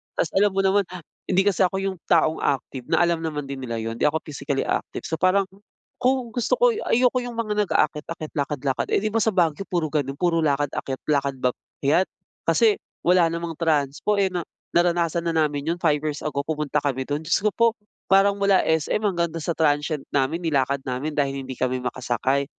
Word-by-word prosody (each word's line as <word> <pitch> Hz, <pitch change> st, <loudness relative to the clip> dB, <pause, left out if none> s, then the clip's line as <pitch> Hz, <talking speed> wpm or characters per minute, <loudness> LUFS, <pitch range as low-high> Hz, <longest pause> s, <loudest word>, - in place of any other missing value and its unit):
Ta's -, -, 0 dB
alam 200 Hz, 0 st, +2 dB
mo 195 Hz, -, +2 dB
naman 195 Hz, 0 st, +2 dB
ha 180 Hz, -2 st, -9 dB, 0.3 s
hindi 190 Hz, +1 st, +3 dB
kasi 200 Hz, -2 st, +2 dB
ako 190 Hz, -, -4 dB
yung 195 Hz, -1 st, -2 dB
taong 160 Hz, -1 st, +3 dB
active, 130 Hz, -2 st, -2 dB
na -, -, +3 dB
alam 170 Hz, -1 st, +1 dB
naman 155 Hz, -3 st, -3 dB
din 140 Hz, 0 st, -6 dB
nila 120 Hz, -3 st, -4 dB
'yun 115 Hz, 0 st, -4 dB
hindi -, -, +4 dB
ako 160 Hz, +2 st, -1 dB
physically 140 Hz, -2 st, -3 dB
active. -, -, -3 dB
So 160 Hz, -, -3 dB
parang, 185 Hz, +3 st, +4 dB, 0.6 s
kung 255 Hz, -2 st, +1 dB
gusto 240 Hz, 0 st, +1 dB
ko -, -, +4 dB
ayoko 255 Hz, -, +2 dB
yung 245 Hz, -1 st, -6 dB
mga 215 Hz, -2 st, -1 dB
nag-aakyat-akyat, 155 Hz, +1 st, -1 dB
lakad-lakad, 140 Hz, -1 st, -1 dB
eh, 195 Hz, -, +1 dB
'di 215 Hz, -, 0 dB
ba 225 Hz, -, +1 dB
sa 220 Hz, -2 st, +1 dB
Baguio 170 Hz, +1 st, +1 dB
puro 165 Hz, -4 st, -1 dB
ganun 140 Hz, -3 st, -1 dB
puro 170 Hz, +1 st, +1 dB
lakad-akyat, 140 Hz, -3 st, -1 dB
lakad 140 Hz, -2 st, +1 dB
akyat. 140 Hz, +7 st, 0 dB, 0.4 s
Kasi 430 Hz, -2 st, +4 dB, 0.2 s
wala 180 Hz, -1 st, +5 dB
namang 170 Hz, 0 st, -3 dB
transpo, 155 Hz, +4 st, +1 dB
eh, 195 Hz, -2 st, +1 dB
na 180 Hz, -1 st, -2 dB, 0.3 s
naranasan 170 Hz, -1 st, +2 dB
na 165 Hz, -, 0 dB
namin 150 Hz, -3 st, 0 dB
yun -, -, -7 dB
5 155 Hz, -3 st, +3 dB
years 150 Hz, -1 st, -3 dB
ago 140 Hz, -2 st, -2 dB
pumunta 150 Hz, -1 st, -1 dB
kami 140 Hz, -3 st, -1 dB
dun, 145 Hz, +4 st, -3 dB
Diyos 165 Hz, +4 st, +2 dB
ko 215 Hz, -, +3 dB
po 230 Hz, +4 st, +3 dB, 0.4 s
parang 195 Hz, +1 st, +4 dB
mula 200 Hz, -1 st, +4 dB
SM 160 Hz, +6 st, 0 dB
hanggang 185 Hz, -5 st, +1 dB
dun 165 Hz, -, -4 dB
sa 170 Hz, +1 st, -2 dB
transient 150 Hz, -1 st, +1 dB
namin 140 Hz, +3 st, +1 dB
nilakad 140 Hz, -3 st, +1 dB
namin 130 Hz, +4 st, -3 dB
dahil 140 Hz, -1 st, 0 dB
hindi 130 Hz, 0 st, -6 dB
kami 130 Hz, 0 st, -1 dB
makasakay 130 Hz, +2 st, -1 dB
160 Hz, 200 wpm, -24 LUFS, 140-190 Hz, 0.6 s, wala